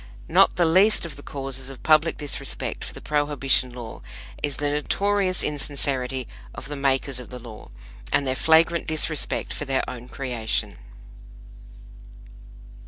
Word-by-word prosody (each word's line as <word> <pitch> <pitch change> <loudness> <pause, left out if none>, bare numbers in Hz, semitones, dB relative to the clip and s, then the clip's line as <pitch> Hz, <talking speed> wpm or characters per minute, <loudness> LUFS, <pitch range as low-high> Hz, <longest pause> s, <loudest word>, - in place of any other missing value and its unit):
Not - - +5
the 175 - +3
least 190 +5 +4
of 160 -4 -7
the 145 - -9
causes 135 -2 -5
of 135 - -10
public 155 +1 +4
disrespect 140 -2 -2
for - - -6
the - - -10
Prohibition 145 -3 +2
law 120 -2 -8 0.4
is 145 -2 -1
the 145 0 -1
notorious 190 +5 +1
insincerity 135 -3 -1 0.3
of 130 - -7
the 145 - -4
makers 135 -1 0
of 125 - -10
the 125 - -7
law, 115 -3 -11 0.4
and 140 - +2
their 130 - +1
flagrant 160 +5 +4
disrespect 155 -1 0
for 145 - -4
their 135 -1 0
own 125 -1 -7
creation. 125 -5 -2
140 Hz, 145 wpm, -24 LUFS, 130-155 Hz, 0.4 s, Not